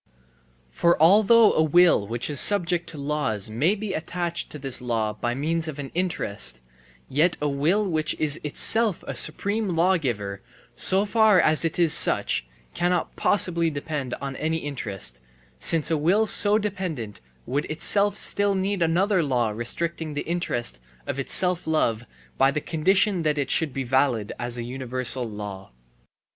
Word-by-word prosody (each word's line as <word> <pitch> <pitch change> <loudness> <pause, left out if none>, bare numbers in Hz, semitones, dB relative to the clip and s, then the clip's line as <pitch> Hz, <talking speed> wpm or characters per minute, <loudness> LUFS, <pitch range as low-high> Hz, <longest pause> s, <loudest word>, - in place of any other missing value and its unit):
For 170 - +1
although 210 +7 +5
a - - +2
will 160 - +3
which 120 +2 -2
is 145 -3 +3
subject 175 -4 +3
to 160 - -10
laws 140 -8 -2
may 150 - +1
be 210 -2 -5
attached 170 +1 -3
to - - -9
this 135 -3 0
law 115 -3 -2
by 120 +3 -3
means 160 +4 -2
of 155 -2 -6
an 140 -2 -7
interest, 105 - -2 0.5
yet 160 +6 +1
a 150 - -1
will 160 +9 0
which 155 -3 -1
is 155 0 +2
itself 210 +7 +2
a - - -5
supreme 205 -3 -1
lawgiver 125 - -1 0.3
so 195 +2 +2
far 215 -2 +3
as 155 -1 +3
it 165 - -2
is 170 -3 +3
such - - +3 0.3
cannot 175 0 -1
possibly 170 -4 +2
depend 145 -3 -5
on 135 0 -7
any 160 +1 -2
interest, 100 - -4 0.4
since 165 0 +2
a 160 - +1
will 190 +9 +2
so 210 0 +2
dependent 180 - -5 0.2
would 145 +3 -2
itself 200 +6 +2
still 200 -1 +2
need 190 0 -2
another 180 +4 +1
law 125 -7 -1
restricting 155 +8 -4
the 145 - -2
interest 120 - -3 0.3
of 140 - -4
its 135 - -5
self 180 -2 +2
love 120 -8 0 0.3
by 135 - +4
the 145 +2 -2
condition 185 +5 +1
that 155 -2 -1
it 140 -2 -2
should 160 -4 +2
be 135 +1 -4
valid 125 -4 0
as 120 0 -3
universal 125 0 -4
law. 105 - -8
155 Hz, 160 wpm, -24 LUFS, 125-180 Hz, 0.5 s, although